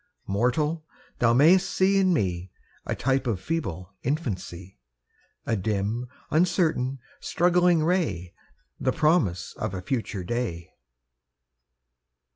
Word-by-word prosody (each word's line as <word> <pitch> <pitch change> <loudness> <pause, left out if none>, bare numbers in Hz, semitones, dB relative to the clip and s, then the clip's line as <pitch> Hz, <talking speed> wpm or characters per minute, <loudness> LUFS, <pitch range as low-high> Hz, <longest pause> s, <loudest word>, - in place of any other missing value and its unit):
Mortal! 125 +10 0 0.4
thou 115 -1 +4
mayst 175 +9 +5
see 195 +1 +3
in 190 -1 +3
me 90 - -1 0.4
A - - -1
type 135 0 0
of 110 -6 0
feeble 95 - -4
infancy, 95 - -4 0.7
A 115 - +1
dim, 105 +4 -1 0.2
uncertain, 155 -6 +2 0.2
struggling 175 -1 +3
ray, 110 - 0 0.5
The 130 - +1
promise 150 - +1
of 95 - -3
a 90 - -4
future 110 -5 -3
day! 90 -6 -3
125 Hz, 105 wpm, -26 LUFS, -, 0.7 s, mayst